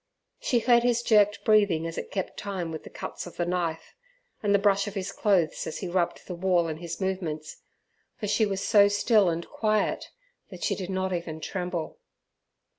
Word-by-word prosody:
She 245 - +1
heard 235 +1 +4
his 240 -1 +1
jerked 210 -2 +4
breathing 205 -7 +4
as 165 0 -4
it - - -5
kept 190 -2 -3
time 190 -5 -4
with 160 - -6
the - - -10
cuts - - -7
of 175 - -12
the 175 - 0
knife, 170 -2 -2 0.5
and 205 - +1
the 200 - +6
brush 200 0 +2
of 205 - -6
his 195 0 -3
clothes 190 -7 +1
as - - -4
he 190 - -4
rubbed 175 -1 -1
the 180 - -6
wall 175 -1 +2
in 155 -1 -4
his 170 0 -6
movements, 170 -6 -3 0.6
for 215 - -4
she 210 +2 +2
was 195 -1 -2
so 205 -3 +7
still 205 -1 +3
and 170 0 -3
quiet, 215 -1 0 0.4
that - - -9
she - - +1
did 185 -2 -5
not 190 0 -1
even 170 -2 -4
tremble. 180 0 -4
190 Hz, 195 wpm, -27 LUFS, 170-205 Hz, 0.6 s, so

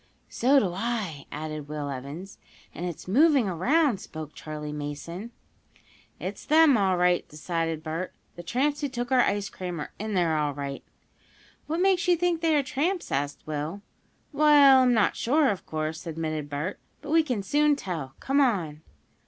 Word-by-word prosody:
"So 265 +4 +3
do 195 -10 +2
I!" 200 -7 -3
added 155 -1 -5
Will 150 -1 -4
Evans. 140 +8 -7 0.3
"And 175 - -4
it's 175 0 -7
moving 275 - +4
around," 245 - +2
spoke 155 -1 -8
Charley 150 -1 -6
Mason. 150 +8 -6 0.9
"It's - - -5
them, 310 -2 +5
all 190 -4 +2
right," 180 0 +2
decided 165 0 -3
Bert. 165 +3 -4 0.2
"The 175 - -7
tramps 270 - 0
who 285 - -1
took 245 -1 -4
our 255 -1 +5
ice 200 -3 0
cream 180 -4 -6
are 150 - -6
in 215 0 -3
there, 170 -3 +2
all 150 -2 0
right!" 140 -1 -5 0.8
"What 325 +3 -1
makes 375 -1 +3
you 355 - +5
think 345 -1 0
they 325 -2 +3
are 290 - +3
tramps?" 330 +8 -2
asked 140 +1 -2
Will. 155 +6 -4 0.5
"Well, 285 -2 +7
I'm 250 -1 +4
not 215 -3 +2
sure, 285 +4 +2
of 195 - -6
course," 155 +1 -4
admitted 155 -2 -3
Bert. 150 +7 -4 0.2
"But 295 - -6
we 325 +1 +6
can 250 -10 -2
soon 295 +7 +3
tell. 165 - -5
Come 275 +2 +2
on!" 175 - 0
190 Hz, 170 wpm, -27 LUFS, -, 0.9 s, Well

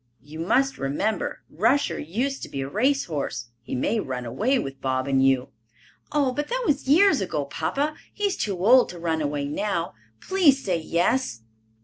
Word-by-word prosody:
"You 155 +2 -10
must 265 +11 +1
remember, 145 +11 -2
Rusher 230 - +1
used 250 - -2
to - - -6
be 135 - -4
a 135 - -3
race 260 - +1
horse. 130 -7 -4
He 120 - -5
may 210 - 0
run 130 -8 -4
away 215 - +1
with 135 - -5
Bob 130 0 -1
and 135 -1 +3
you." 135 -1 +2 0.6
"Oh, 290 -3 +2
but 295 +3 -3
that - - -2
was 285 -6 0
years 330 - +5
ago, 155 -6 -2
papa. 280 - -2 0.2
He 415 - -8
is 400 -2 +2
too 190 -3 -2
old 250 +3 +6
to 180 - -8
run 165 -2 -1
away 145 -1 -1
now. 170 +3 -2 0.3
Please 300 -8 +3
say 180 -3 +1
yes." 170 - 0
180 Hz, 185 wpm, -25 LUFS, -, 0.6 s, old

